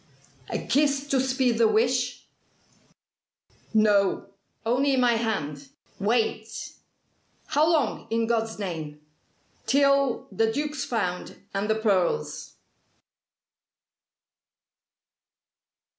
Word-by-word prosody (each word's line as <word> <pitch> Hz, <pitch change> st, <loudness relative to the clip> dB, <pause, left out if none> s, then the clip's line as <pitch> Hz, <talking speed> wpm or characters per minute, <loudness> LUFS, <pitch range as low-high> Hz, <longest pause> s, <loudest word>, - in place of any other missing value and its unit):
"A -, -, -1 dB
kiss 285 Hz, -1 st, +1 dB
to 270 Hz, -, +2 dB
speed 255 Hz, -2 st, +1 dB
the 230 Hz, -, +6 dB
wish?" 245 Hz, +3 st, +1 dB, 1.5 s
"No. 205 Hz, -3 st, +2 dB, 0.3 s
Only 265 Hz, +4 st, +2 dB
my 245 Hz, -1 st, +4 dB
hand. 150 Hz, -12 st, -2 dB, 0.3 s
Wait!" 220 Hz, 0 st, -1 dB, 0.7 s
"How 310 Hz, +3 st, +2 dB
long 295 Hz, -9 st, 0 dB
in 230 Hz, 0 st, +1 dB
God's 225 Hz, -1 st, -1 dB
name?" 160 Hz, -7 st, -5 dB, 0.7 s
"Till 275 Hz, -2 st, +3 dB
the 225 Hz, +3 st, +1 dB
Duke's 295 Hz, +2 st, -2 dB
found 185 Hz, -7 st, -3 dB
and 200 Hz, +2 st, -2 dB
the 220 Hz, -, +3 dB
pearls." 190 Hz, -, 0 dB
225 Hz, 85 wpm, -26 LUFS, 205-265 Hz, 1.5 s, the